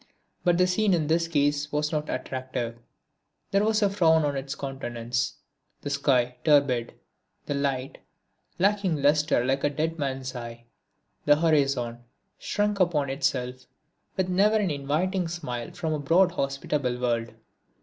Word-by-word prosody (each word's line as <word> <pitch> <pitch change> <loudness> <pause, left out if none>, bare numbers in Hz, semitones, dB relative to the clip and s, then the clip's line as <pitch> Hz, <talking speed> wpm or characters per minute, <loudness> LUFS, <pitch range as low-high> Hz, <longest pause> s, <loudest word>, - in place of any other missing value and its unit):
But 175 -2 +3
the 180 - +4
scene 190 +1 +2
in 160 -3 0
this 165 +2 +1
case 145 -1 +1
was 150 0 0
not 150 -1 -2
attractive. 125 -3 -4 0.7
There 200 +1 +3
was 215 0 +2
a 200 - +4
frown 160 -5 +4
on 145 -1 -1
its 135 +1 -4
countenance; 120 -4 -3 0.5
the 145 - -4
sky 125 -3 +1
turbid; 140 -6 +3 0.5
the - - -2
light 135 -2 -2 0.6
lacking 190 -6 +1
lustre 150 -3 +3
like 135 +1 0
a 145 - +3
dead 160 +3 -2
man's 135 -2 -3
eye; 120 -1 -8 0.6
the 145 - +6
horizon 140 -7 +1 0.4
shrunk 205 -1 -1
upon 150 -7 +2
itself; 130 -2 -2 0.5
with 190 -1 +1
never 200 +4 +3
an 200 -5 0
inviting 160 +6 -1
smile 145 -8 -5
from 160 -3 -3
a 150 - -2
broad 170 +6 +4
hospitable 140 -4 -2
world. 120 -2 -1
145 Hz, 145 wpm, -26 LUFS, 130-170 Hz, 0.7 s, the